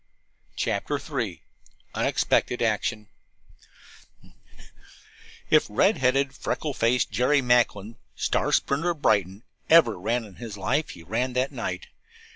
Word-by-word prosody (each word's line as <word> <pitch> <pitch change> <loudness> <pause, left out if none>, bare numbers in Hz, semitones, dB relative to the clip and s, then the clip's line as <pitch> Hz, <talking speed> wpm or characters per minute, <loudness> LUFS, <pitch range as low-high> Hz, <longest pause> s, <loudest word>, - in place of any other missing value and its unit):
CHAPTER - - -1
III - - -4 0.5
UNEXPECTED 120 - +1
ACTION 110 -1 -1 2.4
If - - +5
red - - +3
headed, 135 +1 +1
freckle 150 +2 -3
faced 120 0 +1
Jerry 135 +3 +2
Macklin, 115 -3 +1 0.2
star - - 0
sprinter 150 +6 +1
of 165 -4 -3
Brighton, 100 +2 +1 0.3
ever 155 - +5
ran 115 +5 -1
in 100 -3 -15
his 115 -4 -8
life 135 +11 -1
he 85 - -10
ran 120 +8 -2
that 130 +2 0
night. - - -4
120 Hz, 115 wpm, -25 LUFS, 105-135 Hz, 2.4 s, If